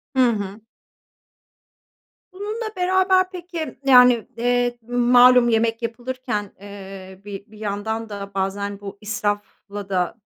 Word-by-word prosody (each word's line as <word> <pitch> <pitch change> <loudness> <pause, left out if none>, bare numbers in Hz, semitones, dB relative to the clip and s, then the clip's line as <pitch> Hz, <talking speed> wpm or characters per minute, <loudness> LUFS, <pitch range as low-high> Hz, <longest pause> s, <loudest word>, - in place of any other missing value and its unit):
Hı 255 -2 +5
hı. 205 -1 -4 1.7
Bununla 430 +3 -5
beraber, 370 0 +3
peki, 345 -3 -6
yani, 250 -3 +6
eee, 245 0 +1
malum, 245 0 +5
yemek 225 0 +1
yapılırken, 235 -2 -4
eee, 195 -2 -10
bi 200 -1 -7
bir 215 -1 -16
yandan 220 +2 -3
da 200 -1 -7
bazen 200 +1 -2
bu 200 -1 -8
israfla 205 -1 -4
da, 180 -1 0
225 Hz, 110 wpm, -22 LUFS, 200-250 Hz, 1.7 s, yani